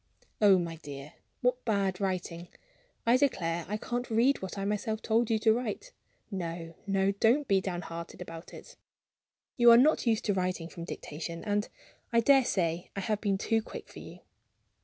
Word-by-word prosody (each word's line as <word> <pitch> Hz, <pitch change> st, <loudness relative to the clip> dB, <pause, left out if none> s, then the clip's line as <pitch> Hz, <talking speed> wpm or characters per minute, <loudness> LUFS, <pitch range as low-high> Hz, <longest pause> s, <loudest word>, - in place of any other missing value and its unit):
"Oh, 200 Hz, -2 st, +7 dB
my 170 Hz, -2 st, -3 dB
dear, 145 Hz, 0 st, -9 dB, 0.3 s
what 250 Hz, 0 st, +1 dB
bad 200 Hz, -4 st, 0 dB
writing! 180 Hz, -3 st, -3 dB, 0.6 s
I 235 Hz, +2 st, +5 dB
declare 175 Hz, -, 0 dB
I 210 Hz, -, -1 dB
can't 245 Hz, +3 st, -4 dB
read 235 Hz, +5 st, +3 dB
what 190 Hz, +1 st, -6 dB
I 195 Hz, -, -2 dB
myself 210 Hz, +2 st, -2 dB
told 225 Hz, +1 st, +2 dB
you 225 Hz, -, +3 dB
to 220 Hz, 0 st, +4 dB
write. 245 Hz, -, -4 dB, 0.4 s
No! 170 Hz, -3 st, -5 dB
no! 195 Hz, 0 st, +2 dB
don't 235 Hz, +8 st, +2 dB
be 195 Hz, -1 st, +3 dB
downhearted 175 Hz, -2 st, -6 dB
about 165 Hz, 0 st, -9 dB
it. -, -, -12 dB, 0.8 s
You 240 Hz, -1 st, +7 dB
are 235 Hz, -, +9 dB
not 275 Hz, 0 st, +4 dB
used 225 Hz, -2 st, +2 dB
to 205 Hz, -, +2 dB
writing 180 Hz, -3 st, -2 dB
from 170 Hz, -1 st, -8 dB
dictation; 165 Hz, +1 st, -6 dB
and 205 Hz, -1 st, -1 dB, 0.4 s
I 235 Hz, -, +4 dB
daresay 195 Hz, -10 st, +2 dB
I -, -, -2 dB
have 210 Hz, +2 st, -1 dB
been 200 Hz, -2 st, +1 dB
too 225 Hz, +3 st, +1 dB
quick -, -, -9 dB
for -, -, -11 dB
you." -, -, -11 dB
200 Hz, 175 wpm, -30 LUFS, 175-230 Hz, 0.8 s, are